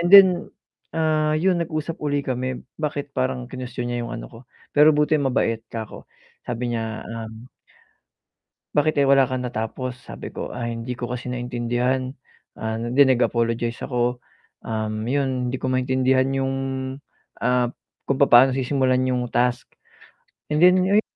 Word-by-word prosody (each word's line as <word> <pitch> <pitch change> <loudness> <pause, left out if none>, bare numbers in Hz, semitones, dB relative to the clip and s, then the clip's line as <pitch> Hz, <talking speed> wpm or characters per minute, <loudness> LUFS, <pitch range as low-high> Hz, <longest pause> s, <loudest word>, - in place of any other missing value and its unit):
and 170 - +1
then, 195 0 +10 0.7
ah, 155 -1 +2
yun 175 +2 +2
nag-usap 160 0 -3
ulit 145 -1 -1
kami. 130 0 -3 0.2
Bakit 145 -2 -3
parang, 130 -1 -1
kinuwestiyon 125 -1 -5
niya 120 - -1
yung - - -6
ano - - -7
ko, 115 - -11 0.3
pero 150 +1 +6
buti 150 0 +3
mabait, 125 -4 +1
ka 115 -1 -4
ko - - -13 0.3
sabi 120 0 -3
niya, 110 -1 -4
um, 115 +1 -8 1.3
bakit 155 +1 +3
eh - - +4
wala 135 -1 +6
kang 130 0 -3
natapos, 125 +2 -4
sabi - - -8
ko, - - -5
ah 120 -1 -4
hindi 115 +2 -4
ko 120 - -3
kasi 125 0 -4
maintindihan 125 +1 -1 0.5
ah, 110 0 -2
and 120 +1 -3
then 140 -1 +8
nag 125 -1 +3
apologize 115 0 0
ako. 125 -1 -1 0.5
Um, 110 -1 -2
yun 130 -2 0
hindi 130 - -2
ko 130 - -3
maintindihan 130 0 +2
yung 135 0 0 0.9
ah, 125 0 +2 0.4
kung 135 0 -1
papaano 130 -1 +7
sisimulan 130 -1 +1
yung 125 -1 0
task. 120 0 +1 0.8
And 150 +1 0
then 180 +1 +7
ayu 205 +2 +4
130 Hz, 155 wpm, -23 LUFS, 120-140 Hz, 1.3 s, then